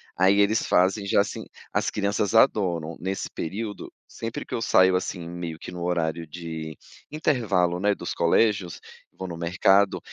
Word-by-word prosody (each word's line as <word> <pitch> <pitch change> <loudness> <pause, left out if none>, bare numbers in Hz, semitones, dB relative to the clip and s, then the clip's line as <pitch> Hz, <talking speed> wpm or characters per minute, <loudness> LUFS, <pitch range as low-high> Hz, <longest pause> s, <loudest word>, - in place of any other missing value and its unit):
Aí 95 +2 +4
eles 105 +2 +3
fazem 95 +3 +2
já, 100 - +4
assim 100 - -5 0.3
as - - +1
crianças 100 +1 -1
adoram. 90 - +2
Nesse 95 +2 -3
período, 105 +5 -5 0.2
sempre 115 0 -6
que - - -9
eu - - -1
saio, 95 -4 +4
assim, 90 -2 -5
meio 85 -2 -6
que 85 - -9
no 90 -1 -7
horário 85 -2 -1
de 80 -1 -7 0.3
intervalo, 110 - +1
né, 100 +1 +2
dos - - -5
colégios, 95 +1 +1 0.3
vou 95 - -7
no 85 - -6
mercado, 95 +4 +3
95 Hz, 160 wpm, -25 LUFS, 85-100 Hz, 0.3 s, Aí